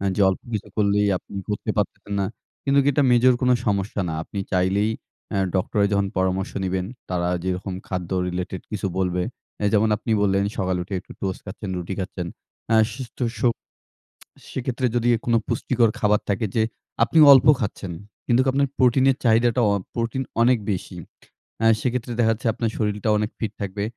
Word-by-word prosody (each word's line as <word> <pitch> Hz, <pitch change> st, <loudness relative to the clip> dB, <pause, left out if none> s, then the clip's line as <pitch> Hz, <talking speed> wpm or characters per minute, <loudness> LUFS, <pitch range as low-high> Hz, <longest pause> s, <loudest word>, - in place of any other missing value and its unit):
যে, 105 Hz, -, +2 dB
অল্প 95 Hz, -, -3 dB
কিছু 105 Hz, -, -3 dB
করলেই 105 Hz, 0 st, +3 dB
আপনি -, -, -13 dB
করতে 105 Hz, -, -3 dB
পারতেছেন 105 Hz, -, -2 dB
না। 95 Hz, -, +1 dB, 0.4 s
কিন্তুক 140 Hz, 0 st, +3 dB
কি -, -, +5 dB
এটা 145 Hz, -, +3 dB
মেজর 125 Hz, +1 st, +5 dB
কোন 125 Hz, -, +3 dB, 0.2 s
সমস্যা 100 Hz, 0 st, 0 dB
না। -, -, -3 dB
আপনি 100 Hz, -, -6 dB
চাইলেই 95 Hz, +4 st, +2 dB, 0.4 s
অ্যা 100 Hz, -, -1 dB, 0.2 s
ডক্টরের 100 Hz, +2 st, +1 dB
যখন 100 Hz, -1 st, +2 dB
পরামর্শ 95 Hz, +1 st, 0 dB
নিবেন 95 Hz, 0 st, -1 dB, 0.2 s
তারা 90 Hz, -1 st, 0 dB, 0.2 s
যেরকম 95 Hz, +1 st, -2 dB
খাদ্য 90 Hz, -2 st, -4 dB, 0.2 s
related 90 Hz, 0 st, -4 dB
কিছু 100 Hz, -2 st, -2 dB
বলবে। 90 Hz, -1 st, 0 dB, 0.4 s
অ্যা 105 Hz, -, +1 dB
যেমন 110 Hz, +1 st, +4 dB
আপনি 110 Hz, -, -4 dB
বললেন 100 Hz, -1 st, +2 dB
সকালে 95 Hz, -1 st, 0 dB
উঠে 100 Hz, -, -8 dB
একটু -, -, -16 dB
toast 95 Hz, -2 st, -2 dB
খাচ্ছেন, 95 Hz, +1 st, -7 dB
রুটি 90 Hz, +2 st, -4 dB
খাচ্ছেন 90 Hz, -2 st, -4 dB, 0.4 s
হ্যাঁ। 110 Hz, -1 st, +5 dB
সুস্থ 125 Hz, 0 st, -9 dB, 0.2 s
স -, -, -8 dB, 1.1 s
সেক্ষেত্রে 130 Hz, 0 st, -2 dB
যদি 120 Hz, 0 st, +2 dB, 0.2 s
কোন 120 Hz, -, +1 dB
পুষ্টিকর 120 Hz, -3 st, +1 dB
খাবার 105 Hz, 0 st, +3 dB
থাকে 100 Hz, +2 st, 0 dB
যে, 115 Hz, -, +3 dB, 0.4 s
আপনি 120 Hz, +8 st, 0 dB, 0.2 s
অল্প 130 Hz, -2 st, +5 dB
খাচ্ছেন 100 Hz, -4 st, -4 dB, 0.3 s
কিন্তু 120 Hz, +1 st, +3 dB
আপনার 140 Hz, +1 st, +2 dB
প্রোটিনের 130 Hz, +1 st, +4 dB
চাহিদাটা 120 Hz, +1 st, +3 dB
অ -, -, +3 dB, 0.2 s
প্রোটিন 115 Hz, +3 st, -1 dB, 0.2 s
অনেক 125 Hz, +1 st, +5 dB
বেশি। 90 Hz, -1 st, -4 dB, 0.6 s
অ্যা 115 Hz, -, +3 dB
সেক্ষেত্রে 125 Hz, -1 st, -2 dB
দেখা 115 Hz, -1 st, +4 dB
যাচ্ছে 115 Hz, +2 st, -4 dB
আপনার 115 Hz, +1 st, -1 dB
শরীরটা 105 Hz, 0 st, -1 dB
অনেক 105 Hz, 0 st, -1 dB
fit 110 Hz, -3 st, -2 dB
থাকবে। 100 Hz, 0 st, -3 dB
105 Hz, 175 wpm, -23 LUFS, 95-120 Hz, 1.1 s, কি